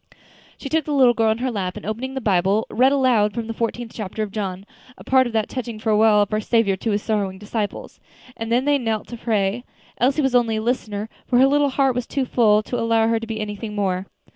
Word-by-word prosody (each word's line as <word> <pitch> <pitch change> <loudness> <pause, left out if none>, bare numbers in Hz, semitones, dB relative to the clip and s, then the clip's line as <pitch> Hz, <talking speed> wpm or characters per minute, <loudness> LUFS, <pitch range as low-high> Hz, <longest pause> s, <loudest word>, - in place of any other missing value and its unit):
She - - -7
took 315 +2 0
the 300 - -2
little 255 -3 +5
girl 225 -1 +2
in 220 - -1
her 255 +1 -2
lap, 185 -5 -3
and - - -9
opening 245 +6 -4
the 265 - -3
Bible, 200 0 +2
read 260 +3 +4
aloud 245 -7 +2
the 230 -1 -3
fourteenth 230 0 -3
chapter 215 0 -4
of 205 - -6
John, 195 -2 -4 0.3
a - - -12
part 260 -1 +3
of 240 - -7
that 220 -1 0
touching 240 -4 -5
farewell 215 -1 +4
of 205 - -6
our 215 - +1
Saviour 220 -3 +2
to 225 - -3
His 205 -1 0
sorrowing 200 -4 -1
disciples; 210 +1 -5 0.4
and 225 0 -5
then 245 +3 +2
they 290 -1 +3
knelt 225 -3 -2
to 240 - -6
pray. 220 0 -1 0.4
Elsie 275 +4 +2
was 265 -2 +1
only 235 -3 +2
a 215 - -1
listener, 215 -3 -2 0.2
for 245 - +2
her 260 - +6
little 285 +1 +3
heart 270 0 +2
was 245 0 -3
too 275 -2 -1
full 215 -4 +3
to 245 +2 -3
allow 230 -1 +2
her 230 0 +1
to 230 - -7
be 220 -1 -4
anything 210 0 -5
more. 190 -2 -1
225 Hz, 240 wpm, -22 LUFS, 210-250 Hz, 0.4 s, her